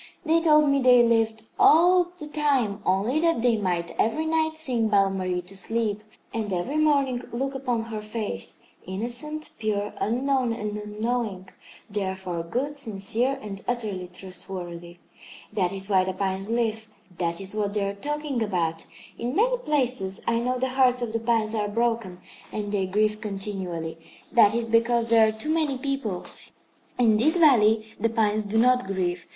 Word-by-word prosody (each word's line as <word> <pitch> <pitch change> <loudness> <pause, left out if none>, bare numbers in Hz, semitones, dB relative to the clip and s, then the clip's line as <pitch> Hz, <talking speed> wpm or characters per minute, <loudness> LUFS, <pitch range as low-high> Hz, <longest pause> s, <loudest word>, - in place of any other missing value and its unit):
They 325 +1 +3
told 305 -2 +5
me 280 -1 +3
they 250 -1 +7
lived 225 -1 +1 0.2
all 355 +3 +6
the 305 - -7
time 275 -9 0
only 205 +10 +2
that 330 -8 +1
they 240 -2 +4
might 175 -5 -1
every 310 +9 +1
night 315 0 0
sing 250 -8 0
Belle 200 -2 +3
Marie 185 -2 -2
to 185 +3 -9
sleep, 215 +1 -1 0.3
and 220 -3 -2
every 190 +12 -1
morning 280 -5 +2
look 270 +3 -2
upon 250 -4 -1
her 225 -2 -5
face, 210 - -5 0.2
innocent, 245 +11 -4
pure, 210 -1 -1
unknown 255 +1 +1
and 210 -2 -4
unknowing, 210 -2 -3 0.4
therefore 190 -4 -3
good, 265 +12 -3
sincere 230 +2 0
and 195 -2 -7
utterly 215 -7 -2
trustworthy. 180 -1 -8 0.6
That 185 -4 +1
is 195 0 -4
why 190 -3 +4
the 190 0 -2
pines 195 +1 -2
live. 225 -1 -1 0.3
That 170 -1 -1
is 195 0 -5
what 210 -1 -2
they 200 -1 +1
are 200 - -2
talking 290 +3 -3
about. 170 -6 -1 0.3
In 245 +4 -2
many - - +2
places 250 - -1
I 230 - +1
know 250 +2 0
the 260 +1 -1
hearts 255 -1 +3
of 225 -2 -4
the 230 - 0
pines 225 -1 +1
are 210 -2 0
broken, 225 -5 -1 0.3
and 205 -1 -4
they 195 -2 0
grieve 215 +2 +1
continually. 190 -6 -4 0.3
That 225 -3 +5
is 235 -1 -1
because 230 0 +2
there 225 -1 +6
are - - +1
too 220 +9 -3
many 305 -5 0
people. 255 -9 -3 0.7
In 225 -4 +4
this 310 +10 +3
valley 220 -8 +4
the 230 +2 +1
pines 215 -2 +1
do 205 +2 -1
not 250 0 +4
grieve. 180 -2 -2
220 Hz, 170 wpm, -25 LUFS, 195-255 Hz, 0.7 s, they